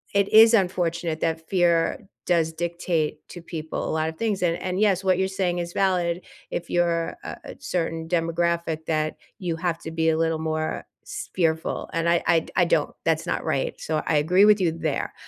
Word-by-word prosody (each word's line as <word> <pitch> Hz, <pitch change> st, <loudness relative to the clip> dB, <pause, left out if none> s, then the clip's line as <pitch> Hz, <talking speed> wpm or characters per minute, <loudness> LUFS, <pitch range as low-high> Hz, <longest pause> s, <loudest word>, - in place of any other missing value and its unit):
it 200 Hz, 0 st, +4 dB
is 225 Hz, +1 st, +8 dB
unfortunate 170 Hz, -4 st, 0 dB
that 160 Hz, 0 st, -2 dB
fear 175 Hz, -3 st, +2 dB, 0.3 s
does 165 Hz, -2 st, +2 dB
dictate 165 Hz, -2 st, -2 dB
to 175 Hz, -, -9 dB
people 160 Hz, -2 st, -4 dB
a -, -, -2 dB
lot 160 Hz, 0 st, 0 dB
of 160 Hz, -, -9 dB
things, 215 Hz, -4 st, -1 dB
and 170 Hz, -1 st, +1 dB
and, 185 Hz, +1 st, -3 dB
yes, 195 Hz, -3 st, +3 dB
what 185 Hz, -1 st, +2 dB
you're 190 Hz, -, +2 dB
saying 185 Hz, -2 st, -1 dB
is 170 Hz, 0 st, -4 dB
valid 180 Hz, -2 st, +1 dB, 0.3 s
if 175 Hz, -, -4 dB
you're, 170 Hz, -1 st, +1 dB
uh, -, -, -6 dB
a -, -, -8 dB
certain 165 Hz, -2 st, -2 dB
demographic 170 Hz, -1 st, 0 dB
that 155 Hz, -1 st, 0 dB, 0.2 s
you 170 Hz, -4 st, -2 dB
have 170 Hz, -1 st, -1 dB
to 160 Hz, -, -6 dB
be 160 Hz, 0 st, +1 dB
a 160 Hz, -, +2 dB
little 165 Hz, -1 st, +1 dB
more 155 Hz, 0 st, -2 dB, 0.2 s
s 420 Hz, 0 st, -7 dB
fearful, 160 Hz, -3 st, 0 dB
and 165 Hz, 0 st, +1 dB
I 170 Hz, -, +2 dB
I 165 Hz, -1 st, +5 dB
d -, -, -13 dB
I 180 Hz, -, +4 dB
don't 160 Hz, -3 st, +1 dB
that's 165 Hz, 0 st, +1 dB
not -, -, -1 dB
right, 135 Hz, -, -1 dB
so, 155 Hz, -1 st, -1 dB
I 165 Hz, -, +2 dB
agree 180 Hz, +7 st, +4 dB
with 210 Hz, -1 st, +6 dB
you 170 Hz, -3 st, +2 dB
there. 160 Hz, -3 st, -2 dB
170 Hz, 205 wpm, -24 LUFS, 160-180 Hz, 0.3 s, is